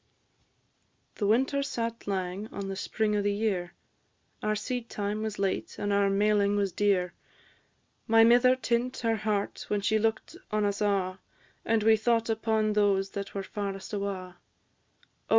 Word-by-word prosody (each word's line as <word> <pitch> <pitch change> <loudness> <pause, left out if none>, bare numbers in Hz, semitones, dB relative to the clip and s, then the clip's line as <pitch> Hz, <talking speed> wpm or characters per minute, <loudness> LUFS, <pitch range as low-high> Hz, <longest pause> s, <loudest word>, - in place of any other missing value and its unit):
The 205 - -2
winter 265 +6 +2
sat 230 -5 -4
lang 190 +1 -2
on 200 -3 -6
the 195 - -3
spring 210 +2 -1
o' 205 - +1
the 205 0 +1
year, 195 -5 -1 0.7
Our 215 0 0
seedtime 215 -2 -3
was 220 -1 -3
late, 195 -1 -2
and 205 0 -1
our 200 0 +3
mailing 205 0 +2
was 200 -2 0
dear; 185 -2 +1 0.9
My 225 0 +6
mither 245 +2 +6
tint 245 +1 -1
her 225 -1 +1
heart 210 -1 -2
when 205 -1 0
she 215 +2 +2
look'd 225 +9 -1
on 215 -1 +1
us 200 +1 -1
a', 195 -2 0 0.4
And 225 -1 +1
we 220 0 +5
thought 230 +1 +1
upon 220 -1 +1
those 200 -2 +2
that 200 0 -6
were 195 - -2
farest 195 0 -5
awa'. 190 -3 -4
210 Hz, 150 wpm, -28 LUFS, 200-225 Hz, 0.9 s, My